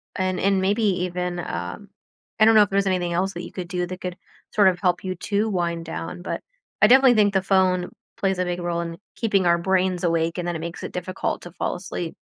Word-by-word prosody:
And 185 -1 -1
and 195 0 +2
maybe 205 +4 +1 0.2
even, 180 0 -3
um, 205 +3 -5 0.5
I 215 - +7
don't 225 0 +6
know 215 - +8
if 205 - -2
there's 195 0 +1
anything 180 -2 0
else 190 +3 0
that 175 - -6
you - - -8
could 180 -2 -6
do 180 0 -2
that 180 +1 -8
could 180 0 -5 0.3
sort 205 -2 +5
of 180 -1 -2
help 180 -2 +1
you 185 -1 -3
to 205 +4 -1
wind 170 -4 -1
down, 165 +2 -6
but - - -4 0.4
I 215 - +8
definitely 260 +1 +7
think 205 -2 +4
the 190 - +3
phone 185 -2 +2 0.3
plays 190 -2 0
a 185 - +1
big 175 0 -2
role 170 -1 -1
in 165 -1 -5 0.2
keeping 200 -5 +1
our 170 0 +4
brains 185 0 +1
awake 165 0 +1
and 175 - -3
then 175 - -2
it - - -3
makes 170 +1 -6
it - - -5
difficult 185 +1 -3
to 175 - -9
fall 175 - -2
asleep. 175 -2 -5
185 Hz, 240 wpm, -23 LUFS, 175-195 Hz, 0.5 s, know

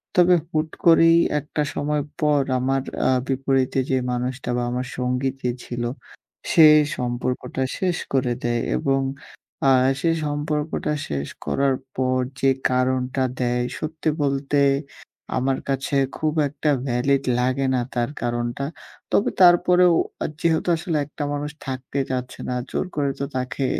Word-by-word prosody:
তবে 180 0 +6
হুট 155 -1 -1 0.2
করেই 165 0 +7 0.2
একটা 150 +1 -4
সময় 145 0 -1 0.2
পর 150 -2 +3 0.2
আমার 135 +1 +1 0.3
আ - - +4 0.2
বিপরীতে 135 0 +1
যে 130 - +2
মানুষটা 125 +1 -3
বা 120 - 0
আমার 125 +1 -2
সঙ্গী 125 +1 0
যে 125 - 0
ছিল, 120 -1 -4 0.7
সে 160 -2 +8 0.3
সম্পর্কটা 125 +1 -2 0.2
শেষ 180 -3 0 0.2
করে 125 -2 +2
দেয়। 120 -1 0 0.2
এবং 135 -1 +1 0.7
আ - - +6 0.3
সেই 165 -1 +2
সম্পর্কটা 150 +1 -2 0.2
শেষ 70 -1 -2 0.2
করার 135 -1 +1 0.2
পর 130 0 +1 0.2
যে 135 - +4 0.2
কারণটা 130 +1 +1 0.2
দেয়, 120 0 +1 0.2
সত্যি 155 0 -2
বলতে 140 0 +1 0.8
আমার 130 +1 +1
কাছে 135 +1 -1 0.2
খুব 155 -1 0
একটা 150 +2 -2 0.2
ভ্যালিড 135 +3 +1 0.2
লাগে 130 +2 +1
না 125 - +1
তার 120 +1 0
কারণটা। 120 +2 -2 0.5
তবে 205 - +3
তারপরেও 180 0 +6 0.3
আ - - 0 0.2
যেহেতু 165 +1 +1
আসলে 165 -2 -2
একটা 145 +1 -6
মানুষ 145 +1 -3
থাকতে 130 +1 -4
চাচ্ছে 125 -1 -4
না 125 - -1 0.2
জোর - - -1
করে 140 -2 +1
তো 140 - -1
তাকে 130 +1 -2
135 Hz, 140 wpm, -23 LUFS, 125-150 Hz, 0.8 s, সে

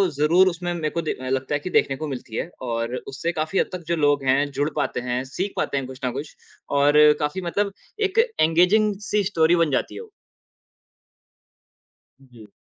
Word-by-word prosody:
ज़रूर 165 +6 +4
उसमें 175 0 -2
मेरे 155 -3 -2
को 170 - -2
दे 155 - -2
अ, 130 0 -7
लगता 130 +2 -1
है - - 0
कि 165 - -6
देखने 135 - +2
को 155 +2 -4
मिलती 125 -4 -7
है, 165 - -3
और 115 -1 -2
उससे 140 +6 -4
काफ़ी 160 +3 -1
हद - - +1
तक, 180 - -5
जो 170 - +1
लोग 145 -3 +2
हैं, 135 +2 +2
जुड़ 145 +2 -1
पाते - - -1
हैं, 125 +1 -1
सीख 195 +2 -2
पाते 140 - -1
हैं 135 -2 -3
कुछ 130 -1 -10
न 125 - 0
कुछ, 140 +4 -7 0.3
और 145 +1 +4 0.2
काफ़ी 150 +5 -2
मतलब 200 +1 0 0.4
एक 425 +4 0 0.2
एंगेजिंग 180 +7 +4 0.2
सी 210 -1 +2
स्टोरी 170 -3 +3
बन 150 - -4
जाती 130 - -1
है - - -6
वो। 450 - -13 2.1
जी। 120 -5 -16
150 Hz, 200 wpm, -23 LUFS, 135-175 Hz, 2.1 s, ज़रूर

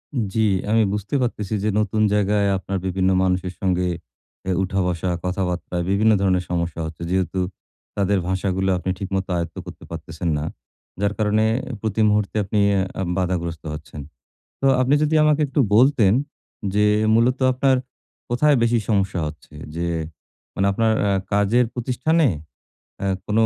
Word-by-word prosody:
উম 120 - +1
জি 110 - +1 0.3
আমি 110 +1 +4
বুঝতে 105 +6 -3
পারতেছি 110 -4 -2
যে, - - +1
নতুন 110 0 0
জায়গায় 105 0 +2
আপনার 95 0 -4
বিভিন্ন 95 0 +1
মানুষের 90 0 0
সঙ্গে 90 -2 +1 0.6
এ - - +2
উঠা-বসা, 90 -2 -1 0.2
কথাবার্তা 90 -1 -2
বিভিন্ন 105 +3 +3
ধরনের 95 -2 +2
সমস্যা 85 -1 -2
হচ্ছে। 80 0 -8
যেহেতু 95 0 0 0.6
তাদের 100 0 +2
ভাষাগুলো 95 0 0
আপনি 90 - -4
ঠিকমত 95 0 -2
আয়ত্ত 85 -1 -4
করতে - - -11
পারতেছেন 80 +1 -4
না। 75 - -3 0.6
যার 100 0 +1
কারণে 110 0 +2 0.4
প্রতি 110 0 -1
মুহূর্তে 105 -1 0
আপনি 105 +2 -1
অ্যা 95 -1 +2 0.2
আম 90 - -2
বাধাগ্রস্ত 85 -3 -2
হচ্ছেন। 75 -1 -8 0.6
তো 135 - +1
আপনি 130 +3 +3
যদি 150 +1 +1
আমাকে 150 0 +3
একটু 140 +2 0 0.2
বলতেন 120 -5 +5 0.6
যে, 105 0 +3 0.3
মূলত 120 +3 +3
আপনার 130 +1 +2 0.5
কোথায় 140 +4 +3
বেশি 115 0 +3
সমস্যা 100 -4 +1
হচ্ছে? 75 0 -13 0.2
যে, 85 0 -1 0.7
মানে 95 - +1
আপনার 110 +2 +2 0.2
আ 100 - +2 0.2
কাজের 105 +5 +3
প্রতিষ্ঠানে? 130 +6 +1 0.8
আ - - -1 0.2
কোনও 110 +2 +2
100 Hz, 150 wpm, -22 LUFS, 90-110 Hz, 0.8 s, বলতেন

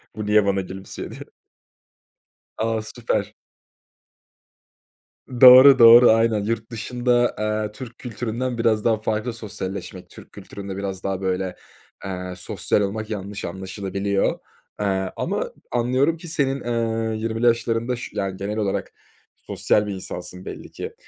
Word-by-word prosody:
bu 105 - -4
niye 105 0 +4
bana 100 -1 +1
gülümsüyor, 95 +1 -8
diye. - - -10 1.4
A. 110 0 -1
Süper. 110 +2 -3 2.1
Doğru, 130 +2 +10
doğru, 120 +1 +9
aynen, 110 -2 +2
yurt 115 +1 -3
dışında, 120 +1 0
eee, 105 0 -1
Türk 120 +1 -10
kültüründen 120 +1 -4
biraz 115 -2 +1
daha 115 -2 +3
farklı 110 +2 -2
sosyalleşmek. 100 -4 -7
Türk - - -14
kültüründe 100 -1 -8
biraz 95 -2 -5
daha, 95 -1 -2
böyle, 95 -1 -2 0.5
eee, 90 -1 -5
sosyal 105 - -1
olmak 105 +2 -3
yanlış 100 -1 -5
anlaşılabiliyor, 95 +2 -2 0.4
eee, 95 -2 -1
ama - - -2 0.2
anlıyorum 130 +7 +1
ki 170 +1 -11
senin, 140 -4 -1
ııı, 115 -2 -1
20'li 115 +1 -2
yaşlarında, 115 +1 +1
ş 120 - -8
yani, 95 -1 -3
genel 105 +2 -4
olarak 100 -3 -2 0.4
sosyal 105 0 0
bir 100 - -3
insansın, 90 0 -8
belli - - -8
ki. - - -7
110 Hz, 130 wpm, -22 LUFS, 100-115 Hz, 2.1 s, Doğru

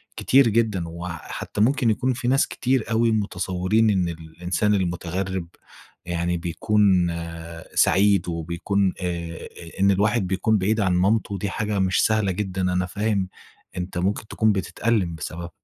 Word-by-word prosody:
كتير 135 -1 +4
جدًا، 110 -4 +1
وحتّى 85 +4 -5
ممكن 125 +1 +3
يكون 130 +4 +1
في 120 0 -4
ناس 135 +2 +3
كتير 125 -3 -1
أوي 115 +1 +3
متصورين 100 +1 +1
إن 95 -4 +1
الإنسان 85 +5 -2
المتغرب 90 0 -2 0.6
يعني 85 0 -1
بيكون 95 +1 +2 0.7
سعيد، 100 -2 +4
وبيكون 85 +4 -1
آآ، 85 -2 -4 0.3
إن 100 +1 +5
الواحد 105 +1 +1
بيكون 95 +4 +1
بعيد 105 +3 +1
عن 95 -3 +2
مامته، 100 +2 +1
دي 100 0 -3
حاجة 105 0 -2
مش 95 0 +2
سهلة 110 -3 +2
جدًا، 95 0 -3
أنا 90 0 +1
فاهم 100 0 -1 0.5
أنت 90 0 -4
ممكن 100 +4 -1
تكون 110 0 +2
بتتألم 100 -1 0
بسببها. 85 +2 -6
95 Hz, 140 wpm, -23 LUFS, 90-110 Hz, 0.7 s, إن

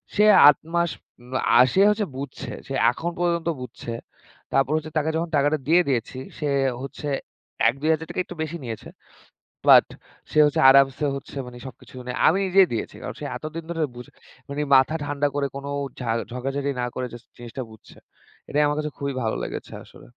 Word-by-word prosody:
সে 210 - +5 0.2
৮ 145 - +7 0.2
মাস 170 -1 +2 0.3
উম 125 +1 -15 0.3
আ - - +7
সে 190 - +4
হচ্ছে 210 0 0
বুঝছে। 140 -1 -6 0.2
সে 135 - -5 0.2
এখন 170 +7 -4
পর্যন্ত 170 -1 0
বুঝছে। 120 -1 -7 0.6
তারপর 135 +1 +2
হচ্ছে 155 0 -5
তাকে 155 +1 +1
যখন 170 0 -2
টাকাটা 145 +2 +2
দিয়ে 175 +3 +5
দিয়েছি, 125 0 -2 0.2
সে 150 - -1 0.3
হচ্ছে 140 +2 -7 0.6
৳১-২,০০০ 155 +7 -1
একটু 175 - -9
বেশি 165 +2 -5
নিয়েছে। 115 -2 -7 0.8
বাট - - +8 0.5
সে - - +1
হচ্ছে 145 - +1
আরামসে 135 +1 +4
হচ্ছে 140 - -10
মানে 125 0 -10
সবকিছু 130 0 -13 0.4
আমি 180 - +1
নিজেই 190 0 +5
দিয়েছি। 110 - -4
কারণ - - -5
সে - - -5
এতদিন 160 +2 -6
ধরে 165 - -3 0.2
বুঝে 125 - -10 0.4
মানে 140 +1 -4 0.2
মাথা 130 +4 +3
ঠান্ডা 145 0 0
করে 145 -1 0
কোন 140 - -6 0.3
ঝা 120 -2 -2 0.2
ঝগড়াঝাটি 135 +3 -2
না 125 - -1
করে 130 0 -3
যাস্ট 120 -1 -12
জিনিসটা 120 +2 -7
বুঝছে। 110 - -16 0.5
এটাই 150 +1 +2
আমার 145 0 0
কাছে 150 0 -3
খুবই 140 0 -2
ভালো 110 -1 -1
লেগেছে - - -7
আসলে। - - -16
145 Hz, 175 wpm, -24 LUFS, 130-160 Hz, 0.8 s, বাট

